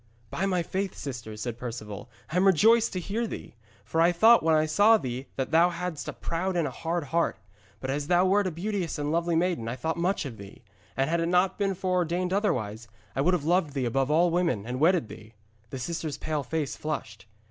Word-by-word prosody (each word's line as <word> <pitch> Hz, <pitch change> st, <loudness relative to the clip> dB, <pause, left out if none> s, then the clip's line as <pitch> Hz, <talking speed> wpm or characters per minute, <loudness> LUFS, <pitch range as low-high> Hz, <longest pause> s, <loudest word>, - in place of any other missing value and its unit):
'By 195 Hz, -, -1 dB
my 180 Hz, -3 st, +1 dB
faith, 190 Hz, +2 st, -3 dB
sister,' 120 Hz, -6 st, -6 dB
said 120 Hz, +1 st, -5 dB
Perceval, 115 Hz, -2 st, -7 dB, 0.2 s
'I 175 Hz, -, -1 dB
am 190 Hz, +2 st, +4 dB
rejoiced 225 Hz, +6 st, +5 dB
to 185 Hz, -, -2 dB
hear 215 Hz, +6 st, -2 dB
thee. -, -, -8 dB, 0.3 s
For 165 Hz, +7 st, 0 dB
I 170 Hz, +1 st, +5 dB
thought 225 Hz, +7 st, +6 dB
when 160 Hz, -1 st, +3 dB
I 155 Hz, 0 st, +3 dB
saw 205 Hz, +9 st, +5 dB
thee 130 Hz, -, -5 dB
that 130 Hz, 0 st, -3 dB
thou 165 Hz, +2 st, +5 dB
hadst 175 Hz, -2 st, -5 dB
a -, -, -4 dB
proud 180 Hz, +3 st, -3 dB
and 165 Hz, -3 st, +1 dB
a -, -, -5 dB
hard 165 Hz, +5 st, -2 dB
heart. 165 Hz, +4 st, 0 dB, 0.4 s
But 130 Hz, -, -3 dB
as 145 Hz, +1 st, -2 dB
thou 180 Hz, +2 st, +4 dB
wert 195 Hz, +1 st, +3 dB
a -, -, -2 dB
beauteous 180 Hz, 0 st, -3 dB
and 145 Hz, 0 st, -2 dB
lovely 170 Hz, +1 st, +1 dB
maiden 170 Hz, -9 st, 0 dB
I 115 Hz, -, -3 dB
thought 160 Hz, +6 st, -3 dB
much 175 Hz, 0 st, 0 dB
of 120 Hz, -5 st, -7 dB
thee; 100 Hz, +4 st, -12 dB, 0.3 s
and 135 Hz, 0 st, +2 dB
had 170 Hz, +1 st, +1 dB
it 165 Hz, -, 0 dB
not 180 Hz, +3 st, +2 dB
been 195 Hz, -1 st, 0 dB
foreordained 180 Hz, 0 st, 0 dB
otherwise, 115 Hz, -, -1 dB, 0.3 s
I 135 Hz, -, +1 dB
would 180 Hz, +6 st, +3 dB
have 150 Hz, -5 st, -4 dB
loved 165 Hz, -4 st, +1 dB
thee 130 Hz, -2 st, 0 dB
above 135 Hz, +3 st, 0 dB
all 170 Hz, +3 st, +3 dB
women 165 Hz, -, 0 dB
and 125 Hz, +2 st, -4 dB
wedded 165 Hz, -4 st, +3 dB
thee.' 110 Hz, +1 st, -12 dB, 0.3 s
The 135 Hz, -, -6 dB
sister's 155 Hz, +2 st, -4 dB
pale 155 Hz, -2 st, -2 dB
face 150 Hz, 0 st, -3 dB
flushed. 110 Hz, -11 st, -5 dB
165 Hz, 225 wpm, -27 LUFS, 135-180 Hz, 0.4 s, thought